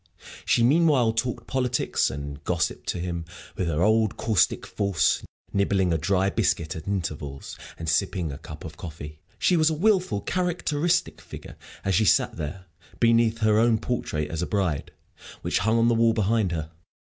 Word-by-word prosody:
She 115 Hz, -, +3 dB
meanwhile 135 Hz, -4 st, +4 dB
talked 120 Hz, +2 st, -2 dB
politics 125 Hz, -2 st, 0 dB
and 70 Hz, +1 st, -7 dB
gossip 85 Hz, +1 st, -1 dB
to -, -, -1 dB
him, 85 Hz, -1 st, -3 dB, 0.3 s
with 90 Hz, -, -2 dB
her 80 Hz, +1 st, 0 dB
old, 110 Hz, 0 st, +2 dB
caustic 110 Hz, -4 st, +1 dB
force, 100 Hz, -4 st, 0 dB, 0.3 s
nibbling 100 Hz, -3 st, +2 dB
a -, -, +2 dB
dry 95 Hz, +3 st, +1 dB
biscuit 80 Hz, -5 st, 0 dB
at 80 Hz, -, -8 dB
intervals 75 Hz, -8 st, -4 dB, 0.2 s
and 80 Hz, -, -6 dB
sipping 85 Hz, 0 st, 0 dB
a 70 Hz, -, -8 dB
cup 80 Hz, -1 st, -10 dB
of 75 Hz, -2 st, -9 dB
coffee. 75 Hz, -4 st, -8 dB, 0.2 s
She 180 Hz, -, +3 dB
was 160 Hz, -1 st, +4 dB
a 160 Hz, -, -1 dB
wilful, 180 Hz, -, +2 dB
characteristic 175 Hz, -, 0 dB
figure -, -, -10 dB, 0.3 s
as 95 Hz, -, +1 dB
she 110 Hz, +5 st, +3 dB
sat -, -, +3 dB
there, 85 Hz, +4 st, -6 dB, 0.3 s
beneath 115 Hz, -1 st, +3 dB
her 110 Hz, 0 st, +4 dB
own 115 Hz, 0 st, +4 dB
portrait 75 Hz, -11 st, -3 dB
as 80 Hz, 0 st, -3 dB
a 90 Hz, -, -2 dB
bride, 95 Hz, -8 st, -1 dB, 0.5 s
which -, -, 0 dB
hung 110 Hz, +4 st, +2 dB
on 115 Hz, 0 st, +3 dB
the 120 Hz, -, +4 dB
wall 115 Hz, 0 st, +3 dB
behind 110 Hz, -2 st, +1 dB
her. 80 Hz, -1 st, -4 dB
100 Hz, 175 wpm, -25 LUFS, 80-115 Hz, 0.5 s, meanwhile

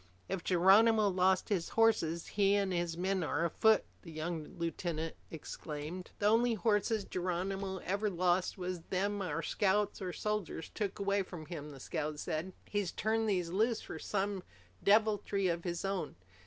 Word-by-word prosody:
"If 190 Hz, -2 st, -3 dB
Geronimo's 200 Hz, +3 st, +5 dB
lost 185 Hz, 0 st, +2 dB
his 185 Hz, -5 st, 0 dB
horses, 170 Hz, -8 st, +3 dB
he 200 Hz, -1 st, +3 dB
and 200 Hz, -2 st, +1 dB
his 170 Hz, -1 st, -1 dB
men 190 Hz, +1 st, 0 dB
are 160 Hz, +1 st, 0 dB
afoot!" 220 Hz, +6 st, +4 dB, 0.2 s
the 165 Hz, -, -10 dB
young 155 Hz, 0 st, -5 dB
lieutenant 165 Hz, -1 st, -3 dB
exclaimed. 160 Hz, +2 st, -6 dB
"The 205 Hz, -, -2 dB
only 230 Hz, +2 st, +4 dB
horses 210 Hz, 0 st, +1 dB
Geronimo 190 Hz, +2 st, -2 dB
ever 200 Hz, +3 st, 0 dB
lost 180 Hz, 0 st, +1 dB
was 180 Hz, -1 st, -4 dB
them 200 Hz, +2 st, 0 dB
our 165 Hz, -3 st, -2 dB
scouts 205 Hz, +1 st, +1 dB
or 185 Hz, -1 st, -2 dB
soldiers 210 Hz, -5 st, -3 dB
took 205 Hz, -3 st, -3 dB
away 200 Hz, 0 st, +1 dB
from 175 Hz, -4 st, -7 dB
him," 150 Hz, -3 st, -6 dB
the 140 Hz, -2 st, -10 dB
scout 150 Hz, +1 st, -3 dB
said. 160 Hz, +6 st, -3 dB, 0.2 s
"He's 205 Hz, -4 st, -1 dB
turned 220 Hz, 0 st, 0 dB
these 180 Hz, -4 st, 0 dB
loose 220 Hz, +4 st, +1 dB
for -, -, -7 dB
some 200 Hz, -1 st, -1 dB, 0.4 s
deviltry 205 Hz, -2 st, +3 dB
of 170 Hz, 0 st, -1 dB
his 175 Hz, +1 st, -2 dB
own. 195 Hz, -1 st, -2 dB
190 Hz, 160 wpm, -33 LUFS, 170-205 Hz, 0.4 s, Geronimo's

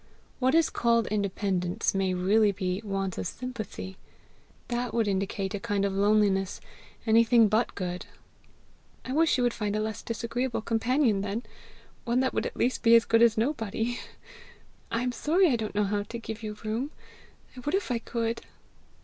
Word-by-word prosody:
What 260 Hz, +3 st, +3 dB
is 330 Hz, -1 st, +4 dB
called 235 Hz, -1 st, +2 dB
independence 195 Hz, -3 st, 0 dB
may 190 Hz, -1 st, 0 dB
really 205 Hz, +4 st, +3 dB
be 185 Hz, 0 st, -2 dB
want 195 Hz, -3 st, -2 dB
of -, -, -2 dB
sympathy. 215 Hz, -, -6 dB, 0.7 s
That 240 Hz, 0 st, -2 dB
would 225 Hz, -2 st, +2 dB
indicate 195 Hz, 0 st, -1 dB
a 205 Hz, -, -2 dB
kind 205 Hz, -2 st, 0 dB
of 200 Hz, -, -1 dB
loneliness 200 Hz, -1 st, +2 dB, 0.5 s
anything 230 Hz, 0 st, +5 dB
but 215 Hz, +3 st, +1 dB
good." 180 Hz, -1 st, -4 dB, 1.0 s
"I 255 Hz, -, -3 dB
wish 320 Hz, -1 st, +3 dB
you 250 Hz, -, +1 dB
would 240 Hz, -1 st, +2 dB
find 210 Hz, -1 st, -2 dB
a -, -, 0 dB
less 215 Hz, 0 st, -3 dB
disagreeable 235 Hz, +1 st, -2 dB
companion 230 Hz, -1 st, +2 dB
then! 205 Hz, +4 st, -3 dB, 0.6 s
one 240 Hz, +1 st, +1 dB
that 260 Hz, -, 0 dB
would -, -, 0 dB
at -, -, -9 dB
least 250 Hz, +2 st, +1 dB
be 230 Hz, 0 st, +6 dB
as 230 Hz, -, +5 dB
good 230 Hz, 0 st, +3 dB
as 230 Hz, -2 st, +5 dB
nobody! 230 Hz, -1 st, -1 dB, 0.9 s
I 230 Hz, +1 st, -1 dB
am 250 Hz, -, 0 dB
sorry 325 Hz, +8 st, +3 dB
I -, -, +3 dB
don't 220 Hz, -3 st, -4 dB
know 210 Hz, -, +3 dB
how 205 Hz, +1 st, 0 dB
to 230 Hz, +3 st, -6 dB
give 225 Hz, -1 st, -7 dB
you 210 Hz, -1 st, -5 dB
room. 230 Hz, +6 st, -1 dB, 0.7 s
I -, -, -9 dB
would 295 Hz, +7 st, -1 dB
if 390 Hz, -9 st, -1 dB
I 235 Hz, -, +1 dB
could. 230 Hz, 0 st, -2 dB
225 Hz, 175 wpm, -28 LUFS, 200-240 Hz, 1.0 s, be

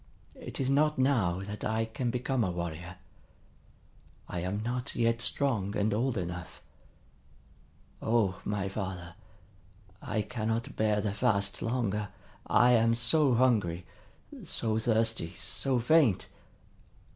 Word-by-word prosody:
It -, -, -7 dB
is 135 Hz, -, 0 dB
not 150 Hz, +2 st, +3 dB
now 115 Hz, -10 st, +2 dB
that 105 Hz, +1 st, -6 dB
I 110 Hz, +1 st, 0 dB
can 120 Hz, +2 st, -3 dB
become 125 Hz, 0 st, 0 dB
a 95 Hz, -, 0 dB
warrior. 85 Hz, 0 st, -5 dB, 1.3 s
I 90 Hz, -, -4 dB
am 95 Hz, +5 st, -2 dB
not 125 Hz, +3 st, -2 dB
yet 115 Hz, 0 st, +1 dB
strong 110 Hz, -7 st, 0 dB
and 105 Hz, +1 st, +1 dB
old 120 Hz, +2 st, 0 dB
enough. 90 Hz, -2 st, -6 dB, 1.4 s
O 110 Hz, -5 st, +1 dB
my 100 Hz, -1 st, -2 dB
father, 95 Hz, -3 st, -5 dB, 0.9 s
I 110 Hz, -, -1 dB
cannot 115 Hz, 0 st, -3 dB
bear 105 Hz, -1 st, +1 dB
the 100 Hz, -1 st, -1 dB
fast 100 Hz, -3 st, 0 dB
longer! 105 Hz, -4 st, -1 dB, 0.4 s
I 125 Hz, 0 st, +5 dB
am 115 Hz, -1 st, +4 dB
so 125 Hz, +3 st, +3 dB
hungry, 105 Hz, -9 st, +2 dB, 0.6 s
so 110 Hz, -1 st, -1 dB
thirsty, 110 Hz, -6 st, +1 dB
so 130 Hz, +8 st, -1 dB
faint! 125 Hz, -, +3 dB
110 Hz, 120 wpm, -30 LUFS, 100-125 Hz, 1.4 s, I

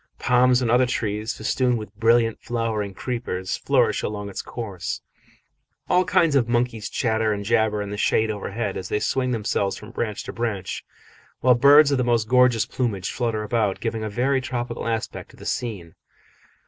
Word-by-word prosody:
Palms 125 Hz, 0 st, +3 dB
and 115 Hz, -, +1 dB
other 125 Hz, +1 st, +4 dB
trees, 110 Hz, -2 st, -2 dB
festooned 125 Hz, +2 st, +1 dB
with 105 Hz, -2 st, -8 dB
brilliant 115 Hz, +1 st, +3 dB
flowering 110 Hz, -4 st, -2 dB
creepers, 105 Hz, -6 st, -3 dB
flourish -, -, +1 dB
along 105 Hz, -1 st, -4 dB
its -, -, -4 dB
course; 100 Hz, -7 st, -5 dB, 0.9 s
all 180 Hz, +1 st, +3 dB
kinds 175 Hz, -4 st, +3 dB
of 120 Hz, -4 st, +2 dB
monkeys 120 Hz, -2 st, 0 dB
chatter 110 Hz, -2 st, 0 dB
and 100 Hz, -1 st, -3 dB
jabber 110 Hz, -2 st, +1 dB
in 100 Hz, -, -7 dB
the 105 Hz, -, -4 dB
shade 110 Hz, +1 st, +2 dB
overhead 105 Hz, 0 st, -4 dB
as 95 Hz, -, -6 dB
they 105 Hz, -, 0 dB
swing 130 Hz, +3 st, 0 dB
themselves 105 Hz, -4 st, -1 dB
from 105 Hz, +2 st, -11 dB
branch 110 Hz, -4 st, -3 dB
to -, -, -7 dB
branch, 105 Hz, -5 st, -3 dB, 0.6 s
while 125 Hz, 0 st, +6 dB
birds 145 Hz, +4 st, +6 dB
of 140 Hz, -, +2 dB
the -, -, +2 dB
most 120 Hz, -3 st, +1 dB
gorgeous 125 Hz, -2 st, +4 dB
plumage 110 Hz, -7 st, -2 dB
flutter 115 Hz, -3 st, -2 dB
about, 105 Hz, -3 st, 0 dB
giving 115 Hz, -1 st, -3 dB
a 110 Hz, -, -3 dB
very 130 Hz, +5 st, +1 dB
tropical 125 Hz, -2 st, -4 dB
aspect 115 Hz, -1 st, -3 dB
to -, -, -18 dB
the -, -, -12 dB
scene. 100 Hz, -9 st, -4 dB
115 Hz, 175 wpm, -23 LUFS, 105-125 Hz, 0.9 s, while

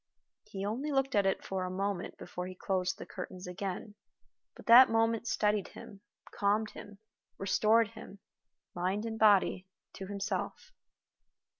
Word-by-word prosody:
He 195 Hz, 0 st, -6 dB
only 255 Hz, +9 st, -2 dB
looked 270 Hz, -1 st, +1 dB
at 200 Hz, -3 st, +3 dB
it 190 Hz, -, -1 dB
for 190 Hz, -1 st, -2 dB
a 185 Hz, -, -3 dB
moment 195 Hz, 0 st, -3 dB
before 180 Hz, 0 st, -6 dB
he 185 Hz, -, -8 dB
closed 185 Hz, 0 st, -1 dB
the -, -, -8 dB
curtains 185 Hz, 0 st, -8 dB
again, 190 Hz, +3 st, -5 dB, 0.6 s
but -, -, -14 dB
that 245 Hz, +3 st, +9 dB
moment 225 Hz, 0 st, +1 dB
steadied 210 Hz, -3 st, +1 dB
him, 200 Hz, -1 st, -12 dB, 0.3 s
calmed 210 Hz, +2 st, 0 dB
him, 205 Hz, -1 st, -11 dB, 0.4 s
restored 215 Hz, +3 st, +3 dB
him 200 Hz, -, -11 dB, 0.6 s
mind 190 Hz, +5 st, -1 dB
and 220 Hz, -1 st, -4 dB
body 200 Hz, -3 st, +4 dB, 0.3 s
to 190 Hz, -, -7 dB
himself. 200 Hz, -, -4 dB
200 Hz, 145 wpm, -31 LUFS, 190-220 Hz, 0.6 s, that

